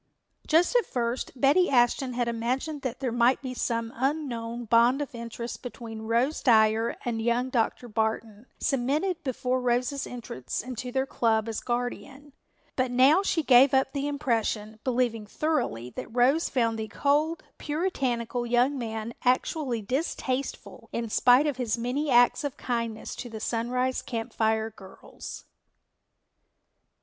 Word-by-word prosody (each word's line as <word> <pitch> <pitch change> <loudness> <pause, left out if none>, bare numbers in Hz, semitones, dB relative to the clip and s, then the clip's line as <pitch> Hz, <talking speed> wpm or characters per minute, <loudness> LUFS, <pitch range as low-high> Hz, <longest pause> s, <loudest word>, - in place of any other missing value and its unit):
Just 335 +9 +3
at 485 - +3
first 240 0 -2
Betty 295 +8 +4
Ashton 250 0 +2
had 240 0 -1
imagined 255 +6 -2
that 255 0 -4
there 255 -3 -1
might 240 +2 +3
be 255 -1 -4
some 230 -2 -2
unknown 240 -4 -2
bond 235 +4 +4
of 290 -3 -4
interest 235 0 -6
between 225 -3 -7
Rose 240 +7 +1
Dyer 220 -1 +3
and 230 -2 -1
young 240 +3 0
Dr. 240 0 0
Barton, 220 0 -2
cemented 300 +7 0
before 255 -1 -1
Rose's 250 +3 0
entrance 225 - -5
into 250 0 -5
their 265 +1 0
club 225 -4 +1
as 225 -2 -3
guardian. 255 +4 -4 0.4
But 255 -1 +1
now 265 +8 +5
she 345 -5 0
gave 265 +1 +6
up 265 0 +2
the 280 0 -1
impression, 225 -6 -1
believing 240 -4 0
thoroughly 165 - -1
that - - -6
Rose 255 +7 +3
found 230 -3 0
the 220 - -3
cold, 295 +8 +1 0.2
puritanical 255 -7 -1
young 250 +4 +2
man 225 -1 -4
actually 255 -1 0
distasteful 260 +1 -3
in 230 -2 -3
spite 250 +6 +5
of 290 -4 -1
his 240 -3 -1
many 255 +6 -1
acts 245 +2 +4
of 285 -2 -4
kindness 230 -3 -3
to 245 - -6
the 220 -1 -7
Sunrise 250 +3 -1
Camp 230 -3 -5
Fire 220 0 +1
girls. 195 -2 -11
245 Hz, 145 wpm, -27 LUFS, 230-270 Hz, 0.4 s, gave